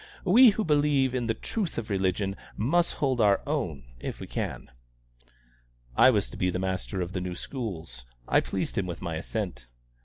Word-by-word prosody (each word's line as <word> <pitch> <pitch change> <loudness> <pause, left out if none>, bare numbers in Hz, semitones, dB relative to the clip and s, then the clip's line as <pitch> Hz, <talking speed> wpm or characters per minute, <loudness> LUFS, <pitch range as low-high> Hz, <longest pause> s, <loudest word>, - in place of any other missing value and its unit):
We, 235 +7 +8
who 215 +1 0
believe 145 -5 +3
in 125 -2 -1
the 115 - +1
truth 200 - -3
of 115 -2 -4
religion, 95 0 0 0.2
must 170 +11 +2
hold 130 -4 0
our 100 -2 +5
own 115 - -2 0.2
if - - -5
we - - -6
can." - - -4 1.2
I 130 - +7
was 105 -6 +2
to - - -8
be 90 - +1
the 90 - -1
master 95 0 -2
of 90 +1 -4
the 90 - -2
new 90 -1 -4
schools. 85 - -6 0.2
I - - +5
pleased - - -2
him 95 - -2
with 85 0 -6
my 85 -2 -3
assent. 85 - -4
105 Hz, 185 wpm, -28 LUFS, 90-135 Hz, 1.2 s, We